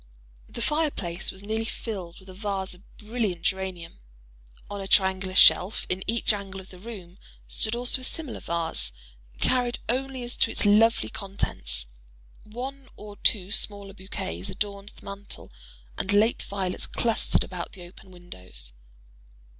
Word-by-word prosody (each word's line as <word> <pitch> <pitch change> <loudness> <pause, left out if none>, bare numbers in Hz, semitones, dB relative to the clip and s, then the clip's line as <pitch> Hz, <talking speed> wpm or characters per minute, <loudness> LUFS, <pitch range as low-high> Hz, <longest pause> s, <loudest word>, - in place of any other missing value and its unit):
The 235 - -4
fire 305 +1 +3
place 175 -8 -3
was 190 +1 -9
nearly 220 +2 -1
filled 195 -6 -5
with 190 - -17
a - - -8
vase 195 -1 -2
of 180 - -13 0.2
brilliant 210 -6 -2
geranium. 185 - -2 0.7
On 205 -1 -5
a 195 - -5
triangular 190 -1 +3
shelf 185 +2 +7
in 185 +1 0
each 230 0 +3
angle 195 -1 -5
of 190 - -12
the 180 - -12
room 190 -4 -9 0.3
stood 220 +1 +5
also 245 +2 +2
a - - -9
similar 300 -1 -4
vase, 165 - -1 0.4
varied 245 - +2
only 260 +1 0
as 240 +1 -3
to - - +4
its - - +1
lovely 225 +3 +5
contents. 195 - 0 0.6
One 260 +5 -6
or 205 -1 -10
two 195 -3 +2
smaller 200 -1 +1
bouquets 140 - -5
adorned 200 -1 -3
the - - -15
mantel, 200 - -8 0.5
and 195 - -1
late 215 +3 +4
violets 190 -2 -2
clustered 230 -2 +1
about 180 -2 -6
the 180 - -10
open 180 +2 -13
windows. 90 - -6
200 Hz, 155 wpm, -27 LUFS, 185-225 Hz, 0.7 s, shelf